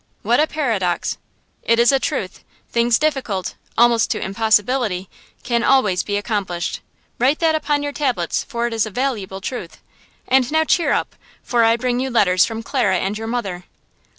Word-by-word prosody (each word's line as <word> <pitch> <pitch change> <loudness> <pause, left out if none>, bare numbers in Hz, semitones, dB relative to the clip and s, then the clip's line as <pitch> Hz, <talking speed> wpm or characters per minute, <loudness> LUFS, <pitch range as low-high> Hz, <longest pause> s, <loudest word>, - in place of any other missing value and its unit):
"What 235 +5 +2
a 310 - +3
paradox!" 220 - -1 0.4
"It 230 - +2
is 235 +2 +5
a 270 - +3
truth. - - -3 0.3
Things 235 -1 +3
difficult–almost 240 -3 0
to - - -1
impossibility–can 220 +2 -1
always 210 -10 +3
be 205 -1 -2
accomplished. 200 -5 -3 0.4
Write 265 +5 +3
that 325 -2 +2
upon 295 -2 0
your 290 - -2
tablets, 250 - -1
for 235 -3 -3
it 240 - -2
is 225 -2 0
a - - -5
valuable 210 -5 -3
truth. 190 -5 -6 0.5
And 260 0 +3
now 315 0 +3
cheer 335 +2 +2
up, - - -1 0.3
for 240 -2 +2
I 225 +1 +4
bring 245 0 -1
you 265 +1 -1
letters 185 -7 +3
from 225 0 -5
Clara 225 -8 +1
and 195 +3 -2
your 225 +1 -5
mother." 195 -7 -3
235 Hz, 165 wpm, -20 LUFS, 200-260 Hz, 0.5 s, is